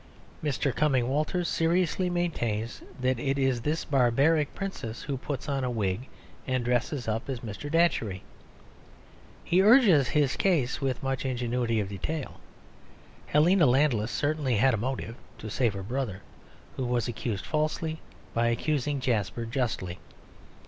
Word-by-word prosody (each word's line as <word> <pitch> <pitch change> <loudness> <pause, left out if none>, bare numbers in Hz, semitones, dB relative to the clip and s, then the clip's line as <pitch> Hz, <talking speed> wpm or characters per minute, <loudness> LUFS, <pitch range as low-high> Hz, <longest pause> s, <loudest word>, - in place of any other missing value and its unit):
Mr. 140 -2 0
Cumming 135 -6 +2
Walters 155 +5 0
seriously 175 +2 +1
maintains 120 -11 -2 0.2
that 130 -1 +1
it 135 +2 0
is 130 -3 +1
this 150 +6 -1
barbaric 140 +3 +2
princess 120 - -5
who 140 - -3
puts 135 +1 -5
on 140 -2 -1
a 125 - 0
wig 110 +1 -2 0.4
and 130 -2 0
dresses 125 +1 0
up 110 +4 -2
as 130 -3 -3
Mr. 110 +5 -6
Datchery. 115 - +1 1.2
He 180 +2 +3
urges 200 - +6
his 145 -2 +2
case 150 -9 +1
with 135 -2 -1
much 135 -1 -1
ingenuity 120 -3 0
of 100 - -1
detail. 135 - -4 0.9
Helena 165 +2 +4
Landless 125 -4 +3
certainly 145 -3 0
had 130 +5 +4
a - - +1
motive; 125 0 -3 0.2
to 110 -2 -7
save 120 -3 +1
her 95 - -5
brother, 110 -3 -3 0.5
who 130 - -1
was 120 -2 0
accused 110 -4 -3
falsely, 155 +1 -1 0.3
by 115 0 +2
accusing 145 +3 0
Jasper 115 -2 -1
justly. 115 -7 -2
130 Hz, 140 wpm, -28 LUFS, 115-150 Hz, 1.2 s, urges